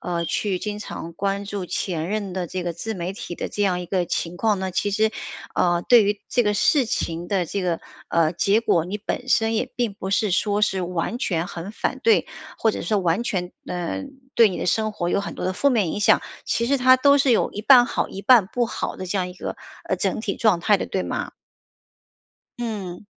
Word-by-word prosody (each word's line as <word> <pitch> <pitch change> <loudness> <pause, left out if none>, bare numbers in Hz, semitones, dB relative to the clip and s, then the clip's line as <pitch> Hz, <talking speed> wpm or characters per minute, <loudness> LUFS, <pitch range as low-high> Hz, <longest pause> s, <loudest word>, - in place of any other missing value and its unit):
呃， 170 -1 -2
去 185 +3 -1
经 210 +2 -4
常 170 -5 -7
关 200 +3 -2
注 200 -2 -4
前 170 -2 -3
任 205 -2 -2
的 180 -1 -3
这 185 +2 -4
个 175 - -2
自 220 +7 -5
媒 180 -1 -4
体 185 -3 -7
的 - - -4
这 205 - -2
样 185 -3 +1
一 180 - -6
个 185 0 0
情 170 0 -3
况 210 +1 +1
呢， 190 0 -2
其 205 - 0
实， 215 +2 +1 0.4
呃， 175 -1 +2
对 240 +2 +6
于 205 0 0
这 245 - +2
个 210 -2 +1
事 270 +6 +3
情 170 -4 -3
的 190 -4 0
这 200 +4 -3
个， 175 -2 -1 0.3
呃， 165 -1 +2
结 200 +5 +2
果 170 -8 +2
你 195 +4 -4
本 205 - -4
身 225 0 +2
也 250 +3 -1
并 235 -5 -1
不 190 -1 -5
是 205 +1 +1
说 205 +2 +1
是 195 -3 +1
完 180 +6 -2
全 175 -9 -1
很 175 0 -7
反 220 - -3
对， 450 -1 +4 0.3
或 225 - +3
者 - - -4
说 210 +4 +1
完 180 +3 +1
全， 180 -6 -3
嗯， 180 +10 -4 0.2
对 230 -2 +6
你 185 - -5
的 - - -3
生 215 +4 +1
活 175 -5 -3
有 200 - +1
很 200 - -6
多 - - -4
的 185 - 0
负 280 +9 +2
面 210 -10 +1
影 - - -3
响， 205 - +5 0.2
其 235 - 0
实 280 +3 +3
它 255 0 +6
都 280 +2 +5
是 275 -1 +3
有 230 - +3
一 210 - -5
半 245 0 +7
好 - - -1
一 195 - -8
半 230 -3 +6
不 240 +4 0
好 - - -4
的 185 - -6
这 195 +2 -1
样 180 -1 -1
一 180 - -10
个， - - -5 0.3
呃， - - 0
整 - - -1
体 205 -3 -3
状 215 -6 +3
态 205 +4 +3
的， - - -3
对 190 - -2
吗？ - - -4 1.3
嗯。 210 -6 -5
200 Hz, 250 characters per minute, -23 LUFS, 180-220 Hz, 1.3 s, 半